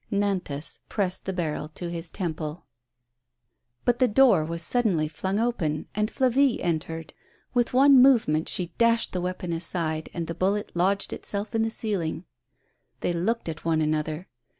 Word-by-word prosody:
Nantas 190 -8 -2
pressed 190 -3 -1
the 190 - -1
barrel 160 -5 -2
to 175 -1 -4
his 165 -1 -5
temple. 160 -3 -4 1.2
But 240 -1 +2
the 255 - +5
door 245 -7 +5
was 165 +1 -3
suddenly 185 -6 +2
flung 190 +6 -2
open, 165 -11 -1
and 210 +1 0
Flavie 260 0 +3
entered. 165 -1 -3 0.4
With 245 -1 +2
one 270 0 +7
movement 220 - +4
she 175 -2 -3
dashed 230 0 +3
the 180 - -2
weapon 180 -1 -3
aside, 165 -2 -2
and 170 -1 -3
the 165 - -4
bullet 195 +4 0
lodged 195 +3 +1
itself 205 +3 -4
in 225 - +1
the 225 - +1
ceiling. 185 -7 -3 0.8
They 175 - 0
looked 210 +7 -1
at 160 -2 -5
one 165 -1 +1
another. 155 +3 -1
180 Hz, 155 wpm, -26 LUFS, 160-220 Hz, 1.2 s, one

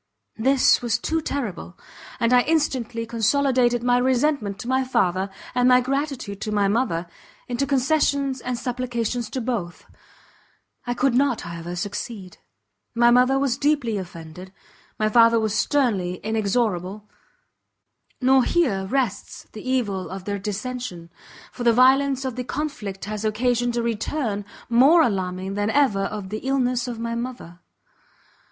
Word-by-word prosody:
This 265 +3 +4
was 235 -2 0
too 320 +6 -1
terrible! 215 - -5 0.4
and 235 0 +2
I 250 - +6
instantly 250 -7 -1
consolidated 240 +1 +1
my 245 0 +3
resentment 255 -5 +1
to - - -8
my 260 +1 +2
father, 190 -6 0 0.2
and 250 0 +3
my 250 0 +6
gratitude 265 -6 -3
to 215 - -3
my 205 -1 +2
mother, 195 -6 0 0.4
into 250 +3 -1
concessions 275 -1 +1
and 250 -1 -3
supplications 240 -2 -3
to 260 - -3
both; 225 -8 -4 1.0
I 245 - -1
could 260 +1 +2
not, 265 -1 +2
however, 170 +1 -6
succeed; 200 0 -6 0.6
my 240 0 +5
mother 250 +2 +4
was 270 -2 0
deeply 280 -8 +1
offended, 175 0 -10 0.5
my 215 - +1
father 230 +1 +5
was 220 -2 -1
sternly 225 -9 +1
inexorable: 210 -2 -1 1.1
nor 260 0 +4
here 220 - +1
rests 240 -4 -2
the 220 +4 -7
evil 205 -8 -1
of 190 0 -7
their 200 -1 -3
dissention, 210 -4 -5 0.4
for 245 - -6
the 235 -1 +5
violence 265 +2 +4
of 260 -3 -3
the 250 - -2
conflict 230 -10 -5
has 210 +1 -5
occasioned 240 +2 0
a 235 - 0
return 225 -2 -2 0.2
more 275 +8 +6
alarming 190 -3 -2
than 205 +1 -1
ever 220 -7 +2
of 205 -2 -5
the 215 +2 -4
illness 255 -2 0
of 240 -2 -5
my 230 0 -3
mother. 235 -8 -6
235 Hz, 145 wpm, -23 LUFS, 205-260 Hz, 1.1 s, I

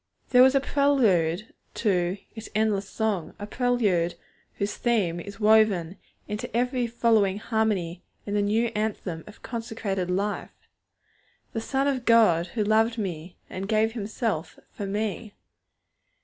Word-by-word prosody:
There 250 - +7
was 265 +1 +6
a - - +6
prelude 225 - +2 0.2
to 185 -3 +1 0.2
its 220 -1 -9
'endless 210 -2 +1
song,' 210 -7 -2
a 205 - -6
prelude 210 -8 +1 0.4
whose 200 +1 -2
theme 205 -8 0
is 200 +4 -9
woven 210 -5 +3 0.3
into 210 +1 -4
every 245 0 0
following 225 -4 +2
harmony 210 -6 -1 0.2
in 205 - -4
the 205 - +2
new 220 +3 +1
anthem 205 -6 -3
of 210 - -14
consecrated 225 -6 -3
life: 200 +3 -1 1.0
'The 225 - -2
Son 270 +4 0
of 260 -3 -1
God, 210 -8 +5
who 215 +5 -2
loved 220 +2 +2
me, 180 -4 -5
and 195 +2 -6
gave 220 0 +2
Himself 215 -5 -3
for 200 - -5
me.' 210 +1 -3
210 Hz, 135 wpm, -26 LUFS, 190-230 Hz, 1.0 s, There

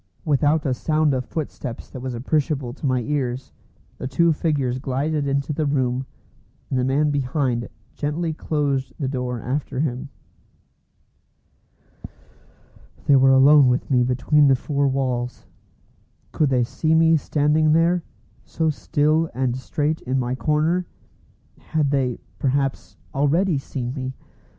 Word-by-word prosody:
Without 150 +1 +2
a 135 - +1
sound 155 +2 +1
of 130 -1 -1
footsteps 140 -6 -5
that 130 - -7
was 130 -1 -4
appreciable 135 0 -1
to 145 - -4
my 130 -1 +1
ears, 130 -2 -2 0.5
the - - -3
two 165 +5 +3
figures 140 -6 -1
glided 140 +3 -1
into 140 +2 -1
the 150 0 -1
room, 130 -2 0 0.6
and 130 - +1
the - - +1
man 145 +3 +2
behind 130 -3 -1 0.2
gently 160 +3 -2
closed 140 -4 -1
the 140 - -2
door 125 -2 -3
after 130 +2 -3
him. 135 -2 -2 3.0
They 145 - +5
were 135 0 +5
alone 135 +1 +7
with 125 +3 0
me 125 -2 +4
between 130 +4 +3
the 135 - +5
four 140 +2 0
walls. 125 -2 -2 0.9
Could 150 -3 +1
they 125 -2 +2
see 155 +6 0
me 165 0 +5
standing 150 +1 +2
there, 170 +2 +3 0.4
so 160 -1 -1
still 155 +2 +1
and 130 -1 0
straight 150 +4 -2
in 130 +1 -1
my 125 -1 -1
corner? 155 +6 0 0.7
Had 150 -3 -1
they, 130 -4 0 0.2
perhaps, 135 0 -1 0.2
already 150 +4 +2
seen 125 -2 -5
me? 130 -1 -5
140 Hz, 135 wpm, -22 LUFS, 130-150 Hz, 3.0 s, alone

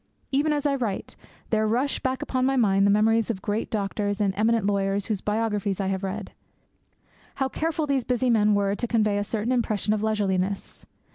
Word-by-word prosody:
Even 290 +3 +2
as 295 -1 -1
I 285 - +3
write, 235 -8 -3 0.4
there 220 -1 +2
rush 250 +6 0
back 260 0 -2
upon 255 -1 -1
my 270 +1 +2
mind 200 -5 +3
the - - +3
memories 220 +2 +3
of 230 - 0
the 190 - -14
great 210 +3 -2
doctors 205 0 -2
and 200 -2 +1
eminent 220 +1 +2
lawyers 200 0 0
whose 210 -4 -2
biographies 210 -2 -1
I 195 -1 0
have 190 -1 -2
read. 195 +1 -4 1.0
How 270 - 0
careful 315 +3 -2
these 275 -3 0
busy 250 +1 +1
men 210 -2 +4
were 200 -1 +1
to 240 +4 -2
convey 215 -3 +1
a - - 0
certain 220 +3 -2
impression 215 -4 0
of 215 - -1
leisureliness! 200 -3 -1
215 Hz, 200 wpm, -25 LUFS, 200-245 Hz, 1.0 s, men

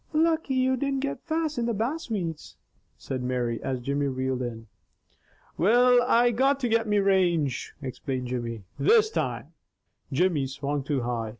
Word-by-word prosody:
"Lucky 320 -3 +2
you 260 0 +2
didn't 275 0 -1
get 280 0 -4
fast 315 -4 -1
in 235 - 0
the 235 - 0
bass 255 +9 -2
weeds," 170 -8 -4 0.4
said 130 -2 -5
Mary 125 -2 -2
as 130 -1 -2
Jimmy 140 +3 -1
reeled 130 -1 -2
in. 115 -2 -5 0.9
"Will, 245 +6 +5
I 245 0 +4
got 270 +4 +2
to 245 - +1
get 225 0 +1
me 210 0 +2
range," 180 -9 +1
explained 130 -1 -4
Jimmy. 115 -4 -4 0.2
"This 440 0 +4
time - - -3 0.3
" - - -42
Jimmy 150 -1 +1
swung 140 +2 -3
too 140 -1 -1
high. 120 -2 -2
180 Hz, 165 wpm, -26 LUFS, -, 0.9 s, Will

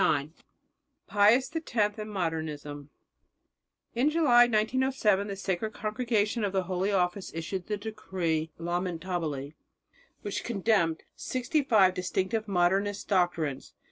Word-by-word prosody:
IX 145 0 +2 0.8
PIUS 235 +8 +4
X 220 -10 0
AND 215 0 -5
MODERNISM 155 -6 -4 1.0
In 250 +5 +2
July 280 -7 +6
1907 220 -2 +1
the 200 - -4
Sacred 195 +2 -2
Congregation 220 0 0
of 200 - 0
the 190 -1 +1
Holy 185 +2 -1
Office 185 0 0
issued 175 +3 -4
the 210 - -1
decree 185 -7 -2
"Lamentabili," 170 -4 -3 0.7
which 205 - -3
condemned 195 -7 +1
sixty 255 +4 -1
five 210 -9 +4
distinctive 190 +4 -1
Modernist 195 +2 +1
doctrines. 170 -8 0
195 Hz, 110 wpm, -29 LUFS, 175-220 Hz, 1.0 s, July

